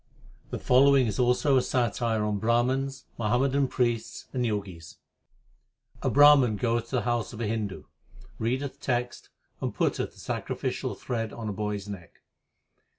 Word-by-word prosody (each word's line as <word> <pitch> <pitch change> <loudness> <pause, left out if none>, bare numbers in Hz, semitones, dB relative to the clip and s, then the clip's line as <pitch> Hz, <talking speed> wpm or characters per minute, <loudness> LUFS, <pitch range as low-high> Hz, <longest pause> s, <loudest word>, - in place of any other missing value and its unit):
The - - -4
following 135 +1 +5
is 110 +2 -3
also 125 +3 +3
a - - +4
satire 120 -3 0
on 105 -1 -1
Brahmans, 130 +4 0 0.2
Muhammadan 130 +5 +2
priests, 120 -3 -1
and 125 -2 0
Jogis: 100 -7 -4 1.0
A - - +1
Brahman 145 -5 +6
goeth 115 0 0
to 130 - -2
the 125 - +2
house 120 +1 -1
of 110 - -8
a 115 - -1
Hindu, 105 -3 -3 0.6
Readeth 130 +5 -2
texts, 120 -1 -2 0.3
and - - -3
putteth - - -1
the - - -18
sacrificial - - -3
thread 115 -3 -3
on 110 -2 -5
a - - -3
boy 105 +1 -2
s 100 0 -7
neck. 95 -5 -8
120 Hz, 150 wpm, -27 LUFS, 105-130 Hz, 1.0 s, Brahman